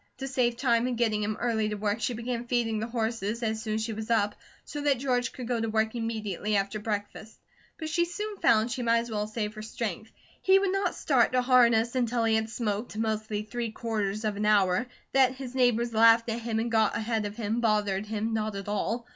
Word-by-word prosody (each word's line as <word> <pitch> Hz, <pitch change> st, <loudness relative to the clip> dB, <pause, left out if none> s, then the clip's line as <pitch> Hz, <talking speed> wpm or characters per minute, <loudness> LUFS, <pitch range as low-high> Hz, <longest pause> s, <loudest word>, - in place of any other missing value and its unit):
To 270 Hz, +1 st, -4 dB
save 245 Hz, -3 st, +1 dB
time 240 Hz, -2 st, +2 dB
in 250 Hz, -, -1 dB
getting 220 Hz, -3 st, +1 dB
him 210 Hz, +1 st, -2 dB
early 220 Hz, -3 st, 0 dB
to 210 Hz, -, -3 dB
work 210 Hz, +2 st, -1 dB
she 235 Hz, +3 st, -1 dB
began 235 Hz, +1 st, -4 dB
feeding 235 Hz, -3 st, 0 dB
the 220 Hz, -, -3 dB
horses 230 Hz, -1 st, -2 dB
as 220 Hz, -1 st, -1 dB
soon 215 Hz, -1 st, -2 dB
as 220 Hz, -, -1 dB
she 225 Hz, 0 st, -3 dB
was 220 Hz, +1 st, -6 dB
up, 210 Hz, -3 st, +2 dB, 0.3 s
so 295 Hz, -, -5 dB
that 285 Hz, -2 st, +2 dB
George 250 Hz, -1 st, 0 dB
could 250 Hz, -3 st, -7 dB
go 240 Hz, -2 st, 0 dB
to 225 Hz, -, -1 dB
work 220 Hz, 0 st, +1 dB
immediately 215 Hz, -3 st, -2 dB
after 200 Hz, +2 st, 0 dB
breakfast; 210 Hz, +1 st, -5 dB, 0.4 s
but 315 Hz, -, -5 dB
she 340 Hz, +2 st, +1 dB
soon 415 Hz, +4 st, -5 dB
found 230 Hz, -4 st, +3 dB
she 250 Hz, -, -3 dB
might 230 Hz, -1 st, +3 dB
as 230 Hz, 0 st, -3 dB
well 210 Hz, -1 st, -1 dB
save 215 Hz, -1 st, -3 dB
her 215 Hz, -, -8 dB
strength. 220 Hz, -1 st, -5 dB, 0.3 s
He 380 Hz, 0 st, +5 dB
would 390 Hz, -1 st, +1 dB
not 390 Hz, -2 st, 0 dB
start 255 Hz, -4 st, +2 dB
to 250 Hz, 0 st, +3 dB
harness 235 Hz, -2 st, +4 dB
until 240 Hz, -2 st, 0 dB
he 225 Hz, -1 st, +2 dB
had 220 Hz, 0 st, +1 dB
smoked, 215 Hz, -1 st, -3 dB
mostly 215 Hz, -1 st, -2 dB
three 235 Hz, +2 st, -4 dB
quarters 215 Hz, -2 st, -2 dB
of 210 Hz, -2 st, -1 dB
an 210 Hz, +1 st, 0 dB
hour. 200 Hz, +1 st, +3 dB, 0.2 s
That 265 Hz, -1 st, +4 dB
his 260 Hz, -1 st, -7 dB
neighbours 240 Hz, -2 st, +2 dB
laughed 230 Hz, +1 st, +5 dB
at 230 Hz, +1 st, -2 dB
him 225 Hz, -1 st, -2 dB
and 230 Hz, +1 st, -1 dB
got 220 Hz, -2 st, +2 dB
ahead 220 Hz, -1 st, -1 dB
of 205 Hz, -, -8 dB
him 225 Hz, +1 st, -1 dB
bothered 210 Hz, -3 st, +1 dB
him 220 Hz, +1 st, -2 dB
not 215 Hz, -1 st, -1 dB
at 195 Hz, 0 st, -6 dB
all. 225 Hz, +3 st, -2 dB
225 Hz, 230 wpm, -28 LUFS, 215-240 Hz, 0.4 s, He